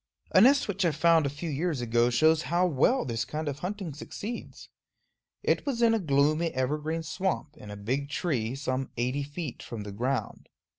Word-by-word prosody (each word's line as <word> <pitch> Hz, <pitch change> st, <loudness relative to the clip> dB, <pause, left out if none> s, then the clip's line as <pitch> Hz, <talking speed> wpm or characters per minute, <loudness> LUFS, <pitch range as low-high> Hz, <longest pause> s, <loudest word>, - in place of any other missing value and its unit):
A 185 Hz, -, +6 dB
nest 275 Hz, +5 st, +5 dB
which 200 Hz, -1 st, -1 dB
I 170 Hz, -, +4 dB
found 160 Hz, 0 st, +3 dB
a -, -, -1 dB
few 150 Hz, +4 st, -5 dB
years 155 Hz, 0 st, -1 dB
ago 120 Hz, 0 st, +2 dB
shows 155 Hz, +6 st, +4 dB
how 175 Hz, +2 st, +3 dB
well 175 Hz, -, +2 dB
this 115 Hz, -2 st, -1 dB
kind 155 Hz, +5 st, -4 dB
of 145 Hz, 0 st, -3 dB
hunting 185 Hz, -2 st, -4 dB
succeeds. 210 Hz, -, -7 dB, 0.8 s
It -, -, +2 dB
was 245 Hz, -5 st, -1 dB
in 230 Hz, -1 st, +5 dB
a 225 Hz, -, +2 dB
gloomy 155 Hz, 0 st, +2 dB
evergreen 150 Hz, +5 st, -1 dB
swamp, 160 Hz, -2 st, -2 dB
in 105 Hz, -9 st, -11 dB
a 105 Hz, -, -7 dB
big 130 Hz, +8 st, -2 dB
tree, 130 Hz, -7 st, -1 dB
some 135 Hz, -1 st, -2 dB
eighty 125 Hz, +4 st, 0 dB
feet 145 Hz, -1 st, -6 dB
from 110 Hz, -3 st, -6 dB
the 105 Hz, -, -7 dB
ground. 125 Hz, +6 st, -3 dB
150 Hz, 190 wpm, -28 LUFS, 130-170 Hz, 0.8 s, A